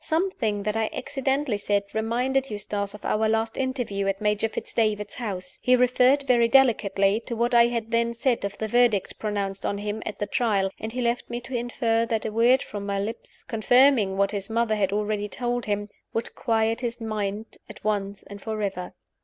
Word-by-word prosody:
Something 290 Hz, -, 0 dB
that 210 Hz, +1 st, -1 dB
I 220 Hz, -1 st, 0 dB
accidentally 270 Hz, -3 st, -1 dB
said 205 Hz, 0 st, 0 dB
reminded 250 Hz, +5 st, 0 dB
Eustace 205 Hz, -1 st, -3 dB
of 210 Hz, -, -11 dB
our 220 Hz, +1 st, +1 dB
last 225 Hz, 0 st, 0 dB
interview 245 Hz, -7 st, -2 dB
at 195 Hz, 0 st, 0 dB
Major 210 Hz, +1 st, +1 dB
Fitz -, -, -6 dB
David's 210 Hz, -2 st, 0 dB
house. 190 Hz, -7 st, -5 dB
He 255 Hz, -, +5 dB
referred, 250 Hz, +3 st, +4 dB
very 240 Hz, -3 st, +4 dB
delicately, 215 Hz, -6 st, +3 dB
to 235 Hz, -, -3 dB
what 235 Hz, +2 st, 0 dB
I 235 Hz, 0 st, +7 dB
had 230 Hz, -1 st, -3 dB
then 235 Hz, 0 st, +1 dB
said 240 Hz, -1 st, 0 dB
of 200 Hz, 0 st, -4 dB
the 220 Hz, -, -2 dB
Verdict 235 Hz, -3 st, +2 dB
pronounced 200 Hz, -2 st, -2 dB
on 200 Hz, -, -1 dB
him 210 Hz, +1 st, -4 dB
at 215 Hz, -, -5 dB
the 205 Hz, -, -1 dB
Trial; 200 Hz, -3 st, +1 dB
and 220 Hz, -, -5 dB
he 250 Hz, +1 st, -2 dB
left 235 Hz, +1 st, -1 dB
me 240 Hz, -, -3 dB
to 245 Hz, +2 st, -10 dB
infer 230 Hz, -1 st, 0 dB
that 225 Hz, -2 st, -1 dB
a 220 Hz, -, -2 dB
word 235 Hz, +4 st, +4 dB
from 205 Hz, -1 st, -6 dB
my 200 Hz, 0 st, -2 dB
lips, 220 Hz, +4 st, -4 dB
confirming 225 Hz, -2 st, +4 dB
what 200 Hz, 0 st, +2 dB
his 200 Hz, -1 st, -4 dB
mother 230 Hz, 0 st, +1 dB
had 195 Hz, -2 st, +1 dB
already 210 Hz, 0 st, -1 dB
told 245 Hz, +1 st, -2 dB
him, 205 Hz, 0 st, -1 dB, 0.3 s
would 225 Hz, -, -3 dB
quiet 225 Hz, -1 st, 0 dB
his 240 Hz, -1 st, -3 dB
mind 215 Hz, -1 st, -4 dB
at 215 Hz, -, -12 dB
once 200 Hz, -1 st, -2 dB
and 200 Hz, 0 st, -11 dB
forever. 200 Hz, -5 st, -3 dB
220 Hz, 195 wpm, -25 LUFS, 205-240 Hz, 0.3 s, I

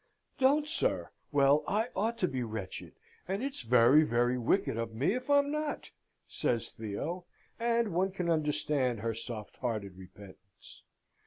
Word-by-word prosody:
"Don't, 285 Hz, +3 st, +4 dB
sir! 320 Hz, -, -1 dB, 0.2 s
Well, 145 Hz, +1 st, +4 dB
I 220 Hz, +4 st, 0 dB
ought 225 Hz, +4 st, 0 dB
to 185 Hz, -, +1 dB
be 130 Hz, -5 st, -3 dB
wretched, 110 Hz, -5 st, -6 dB, 0.3 s
and 195 Hz, +6 st, -2 dB
it's 275 Hz, 0 st, -4 dB
very, 125 Hz, +5 st, +6 dB
very 120 Hz, -3 st, +2 dB
wicked 120 Hz, -2 st, +1 dB
of 115 Hz, -1 st, -4 dB
me 140 Hz, -, +1 dB
if 255 Hz, +3 st, -4 dB
I'm 285 Hz, 0 st, +4 dB
not," 305 Hz, -1 st, -3 dB, 0.4 s
says 120 Hz, -2 st, -1 dB
Theo; 140 Hz, -, -5 dB, 0.3 s
and 230 Hz, -3 st, +1 dB
one 185 Hz, +3 st, +2 dB
can 180 Hz, -2 st, -3 dB
understand 150 Hz, -6 st, 0 dB
her 115 Hz, +1 st, -1 dB
soft 110 Hz, -1 st, -7 dB
hearted 105 Hz, -6 st, -3 dB
repentance. 95 Hz, +1 st, -15 dB
140 Hz, 150 wpm, -31 LUFS, -, 0.4 s, very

